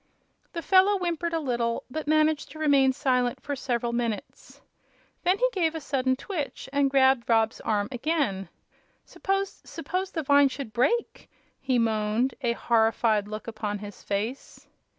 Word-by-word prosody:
The 335 -2 -4
fellow 390 +1 +5
whimpered 345 -2 -2
a 330 - 0
little, 240 -5 -1
but 310 +2 -4
managed 310 0 +2
to - - -11
remain 280 -4 +4
silent 250 -2 0
for 285 - -4
several 240 -3 -2
minutes. 235 -3 -4 0.6
Then 365 +2 +2
he - - +3
gave 330 -5 0
a - - -2
sudden 260 -3 0
twitch 295 +1 -5
and 280 -1 +3
grabbed 265 -3 +3
Rob's 225 -1 +2
arm 205 -2 0
again. 250 - -1 0.6
"S'pose 390 0 -2
s'pose 365 +3 -4
the 320 - -3
vine 285 0 +5
should 260 -4 -7
break!" 460 - 0 0.3
he 260 -2 0
moaned, 225 +2 +1
a 240 -3 +1
horrified 225 -2 +2
look 215 +1 -6
upon 215 -2 -3
his 205 0 -10
face. 215 +7 -4
265 Hz, 150 wpm, -26 LUFS, 230-315 Hz, 0.6 s, fellow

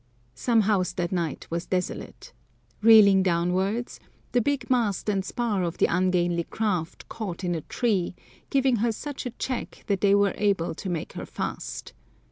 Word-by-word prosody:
Some 230 - +2
house 195 -4 +1
that 175 -1 -2
night 170 -5 -2
was 170 +1 -3
desolate. 185 -1 -4 0.5
Reeling 210 -3 +8
downwards, 185 +6 0 0.3
the 245 - +3
big 270 0 -1
mast 230 -7 +1
and 195 -2 +1
spar 210 0 -1
of 170 -2 -2
the - - +4
ungainly 175 -1 +1
craft 185 -7 -2
caught 195 -5 -5
in 175 -1 0
a 165 - -2
tree, 195 - -1 0.3
giving 265 -3 +3
her 230 +2 +1
such 275 +3 -5
a 245 - -8
check 255 -2 -4
that 200 -2 0
they 200 -1 +5
were 200 -1 +3
able 195 -6 +1
to 185 - -6
make 170 -3 -3
her - - -6
fast. - - -5
195 Hz, 165 wpm, -26 LUFS, 180-225 Hz, 0.5 s, Reeling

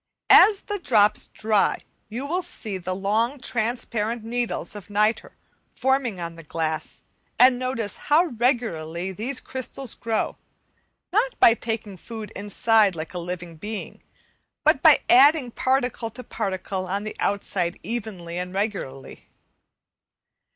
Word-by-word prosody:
As 415 -2 +8
the 415 -1 -4
drops 215 - +3
dry 215 -2 +1 0.3
you 240 +5 -4
will 350 +6 -1
see 220 - -6
the 185 +1 -3
long 220 +8 0
transparent 230 -1 -2
needles 240 -1 -3
of 205 -1 -10
nitre 210 +2 +1 0.4
forming 265 -7 0
on 170 -1 -5
the - - -9
glass, 160 0 -4 0.3
and 250 0 +6
notice 255 -5 -2
how 305 +4 +3
regularly 220 - -1
these 240 +8 -3
crystals 260 -1 -4
grow, 225 -2 -2 0.8
not - - +1
by 230 - +8
taking 225 -4 -4
food 220 +3 -8
inside 205 0 +2
like 160 +1 -6
living 175 -1 -6
beings, 210 +5 -6 0.6
but - - +4
by - - +7
adding 305 -7 +6
particle 250 -2 0
to 245 +3 -10
particle 190 -4 -3
on 200 +3 -2
the 215 - -6
outside 185 -3 -1
evenly 195 -7 -5
and 180 +1 -5
regularly. 195 -10 -4
220 Hz, 130 wpm, -24 LUFS, 190-250 Hz, 0.8 s, As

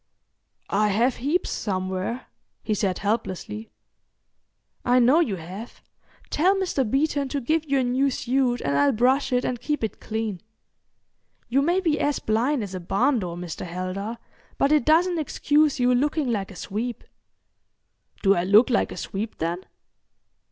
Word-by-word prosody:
"I 210 +2 +3
have 230 +5 +1
heaps 295 +9 -1
somewhere," 190 +4 -3 0.4
he 215 - 0
said 190 -3 0
helplessly. 215 0 -3 1.1
"I 245 0 +3
know 255 +6 +5
you 240 - +1
have. 185 +7 -9 0.5
Tell 365 +6 +3
Mr. 370 -8 0
Beeton 280 +1 +1
to 285 - -1
give 310 +4 -1
you 275 - +3
a 260 - +2
new 255 +3 +2
suit 250 -1 0
and 140 0 -1
I'll 140 0 +4
brush 260 +5 +2
it 250 0 +1
and 245 -2 -2
keep 295 -5 -2
it 220 - -3
clean. 220 -4 -3 1.1
You 265 +3 +3
may 345 +6 +2
be 320 -5 +1
as 290 -1 +1
blind 235 +4 0
as 195 -2 -7
a 185 - -4
barn 235 +9 +1
door, 175 -3 -5
Mr. 175 -2 -6
Heldar, 185 +5 -4 0.4
but 275 - +2
it 300 -5 +3
doesn't 340 +2 +3
excuse 300 -1 +2
you 250 0 +3
looking 290 +1 +1
like 200 -4 -2
a 195 - -11
sweep." 225 +7 -4 1.2
"Do 195 -1 +6
I 175 -3 0
look 210 +7 +5
like 230 - +1
a - - -7
sweep, 210 +3 -5
then?" 170 +3 -3
240 Hz, 160 wpm, -24 LUFS, 195-280 Hz, 1.2 s, Do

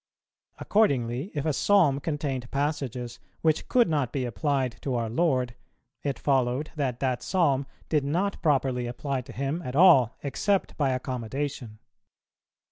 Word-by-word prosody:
Accordingly, 135 - +1
if 145 0 -2
a 155 - +1
Psalm 165 -6 +3
contained 145 -5 -3
passages 135 -4 -3 0.2
which 160 -1 +1
could 245 -2 +4
not 145 -7 0
be 130 -3 -2
applied 125 +2 -1
to 135 -3 -2
our 115 -2 -2
Lord, 130 -4 +1 0.5
it 140 -2 -2
followed 130 +1 0
that 130 -5 -2
that 130 -2 0
Psalm 140 -7 +1 0.2
did 150 -3 +1
not 180 +8 -1
properly 130 -5 +1
apply 135 +2 -3
to 125 +1 -12
Him 140 +7 -2
at 125 -5 -6
all, 140 -8 +6
except 195 +8 0
by 140 -3 +1
accommodation. 130 -1 -4
135 Hz, 140 wpm, -27 LUFS, 125-150 Hz, 0.5 s, all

